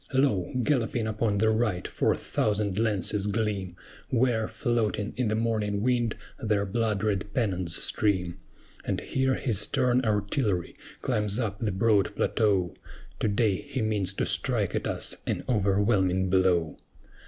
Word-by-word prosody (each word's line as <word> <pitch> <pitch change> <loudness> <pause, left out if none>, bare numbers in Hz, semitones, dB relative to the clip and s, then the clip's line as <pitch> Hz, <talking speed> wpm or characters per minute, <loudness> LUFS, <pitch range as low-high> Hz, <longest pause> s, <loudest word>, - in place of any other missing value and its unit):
Lo! 130 -10 +2
galloping 120 -4 0
upon 110 -1 0
the 110 +2 +3
right 110 -5 0
four - - +1
thousand 105 -2 -1
lances 105 -2 0
gleam, 100 -4 -2 0.3
Where, 120 -3 +1
floating 110 -3 -1
in 125 -2 0
the 105 - 0
morning 110 -3 -1
wind, 120 -3 +1 0.2
their 105 -5 0
blood 110 0 -1
red 105 -1 -1
pennons 95 -8 0
stream; 95 -4 0 0.4
And - - -2
here 130 0 0
his 110 -7 0
stern 125 +2 +2
artillery 105 - 0 0.3
climbs 105 -1 0
up 105 -5 -2
the 110 -3 -1
broad 100 0 +2
plateau: 100 -6 +1 0.5
To - - +1
day 105 0 +2
he 135 -1 -4
means 100 -3 0
to - - 0
strike - - 0
at - - -1
us - - +1
an - - -1
overwhelming 95 -4 +2
blow. 90 -4 +2
105 Hz, 140 wpm, -27 LUFS, 100-115 Hz, 0.5 s, the